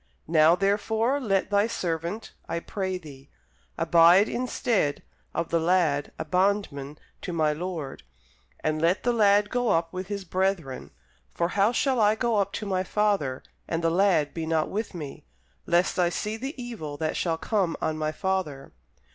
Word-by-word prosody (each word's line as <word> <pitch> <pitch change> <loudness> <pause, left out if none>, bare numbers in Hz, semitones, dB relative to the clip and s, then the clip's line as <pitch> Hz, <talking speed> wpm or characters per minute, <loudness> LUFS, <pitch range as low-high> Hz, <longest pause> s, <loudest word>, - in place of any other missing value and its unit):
Now 160 +1 +5
therefore, 220 +7 +1
let 200 -6 0
thy 205 +1 +3
servant, 170 0 -3 0.2
I 170 - -1
pray 190 +1 -3
thee, 145 -5 -13 0.5
abide 170 +4 +6
instead 235 - -1 0.3
of 170 - -2
the 165 - +2
lad 165 -4 +1
a - - -4
bondman 160 -5 0 0.2
to - - -5
my 155 -3 +1
lord; 160 -4 -5 0.6
and 155 0 -1
let 170 +4 +2
the 245 - +2
lad 205 -2 +4
go 245 -2 +1
up 165 +1 +1
with 185 0 -5
his 200 -2 -4
brethren. 185 -6 -1 0.5
For 170 0 0
how 200 +4 +3
shall 260 +1 +1
I 210 0 +4
go 235 -1 0
up 200 -1 +1
to 215 - -4
my 185 -2 0
father, 190 -11 0 0.2
and 165 0 -2
the 165 - +2
lad 175 -5 +2
be 165 -1 -4
not 160 -1 +1
with 210 -1 -3
me? 150 -5 -7 0.4
lest 175 +2 +2
I 175 -1 +4
see 210 +5 -3
the 265 +5 -6
evil 215 -13 -6
that 155 0 -2
shall 165 -2 0
come 190 -3 0
on 160 0 -1
my 155 0 -1
father. 155 -6 -3
180 Hz, 170 wpm, -26 LUFS, 160-205 Hz, 0.6 s, abide